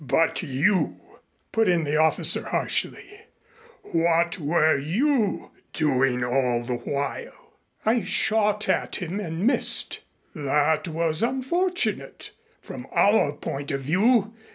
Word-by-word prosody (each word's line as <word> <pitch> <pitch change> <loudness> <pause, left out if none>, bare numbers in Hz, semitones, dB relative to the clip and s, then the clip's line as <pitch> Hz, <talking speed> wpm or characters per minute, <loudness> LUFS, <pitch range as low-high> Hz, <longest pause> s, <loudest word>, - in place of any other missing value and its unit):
"But 160 +5 +1
you" 170 +6 0 0.5
put 225 -3 +2
in 175 -2 +2
the 150 0 0
officer 160 0 +2
harshly 400 +1 -2 0.6
"what 170 +1 +1
were 155 +1 +2
you 215 - 0 0.2
doing 135 -5 +1
all 120 -1 0
the 120 0 -3
while?" 140 +3 -5 0.3
"I 230 +2 +2
shot 210 -1 +1
at - - 0
him 180 +2 -4
and 170 -1 -4
missed." 255 - +2 0.3
"That 150 +2 0
was 165 +1 -1
unfortunate 305 +10 -2 0.3
from - - -9
our 205 -8 +3
point 140 -1 -6
of 135 -2 -2
view. 205 - +2
165 Hz, 115 wpm, -24 LUFS, 145-215 Hz, 0.6 s, our